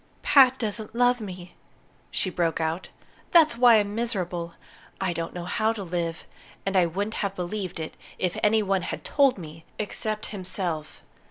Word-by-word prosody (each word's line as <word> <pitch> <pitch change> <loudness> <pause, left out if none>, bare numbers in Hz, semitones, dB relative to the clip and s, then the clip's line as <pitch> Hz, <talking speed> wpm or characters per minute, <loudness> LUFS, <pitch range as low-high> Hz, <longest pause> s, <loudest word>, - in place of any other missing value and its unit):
"Pat 265 -2 +6
doesn't 220 -1 -4
love 245 0 +3
me," 180 -3 -8 0.6
she 185 - -1
broke 170 -2 0
out. 160 +3 -2 0.4
"That's 320 -7 +6
why 240 -1 +7
I'm 205 -1 +2
miserable. 180 -7 -2 0.4
I 185 -2 0
don't 165 0 -4
know 175 -1 -6
how 220 +4 +1
to 210 -3 -6
live. 170 -2 -3 0.4
And 195 0 -1
I 180 -2 +5
wouldn't 200 +6 -3
have 200 -1 -2
believed 180 -1 -4
it 160 - -5 0.2
if 180 -1 -1
any 215 +1 +4
one 195 -1 +1
had - - -5
told 275 -4 +3
me 160 -2 -10
except 215 0 -3
himself." 180 -5 -4
195 Hz, 165 wpm, -26 LUFS, 175-220 Hz, 0.6 s, why